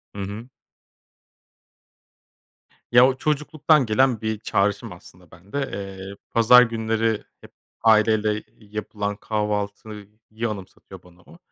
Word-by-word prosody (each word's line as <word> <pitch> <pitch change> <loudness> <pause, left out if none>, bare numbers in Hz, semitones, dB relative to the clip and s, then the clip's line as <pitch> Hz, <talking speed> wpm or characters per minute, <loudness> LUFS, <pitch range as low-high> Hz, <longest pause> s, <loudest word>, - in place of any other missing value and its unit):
Hı 100 - -5
hı. 105 +5 -7 2.4
Ya, 120 +1 +7
o 130 - 0
çocukluktan 150 0 +1
gelen 120 +1 +2
bir 110 -1 -2
çağrışım 100 +1 -1
aslında 90 -1 -16
bende. 90 +9 -9 0.2
Eee, 95 0 -7 0.2
pazar 115 +2 +7
günleri 115 -1 -1 0.2
hep - - -15 0.3
aileyle 110 -1 +3 0.2
yapılan 105 -1 -5
kahvaltıyı 105 0 -3 0.4
anımsatıyor 100 -3 -10
bana 90 0 -20
o. 170 - -17
110 Hz, 105 wpm, -23 LUFS, 100-115 Hz, 2.4 s, Ya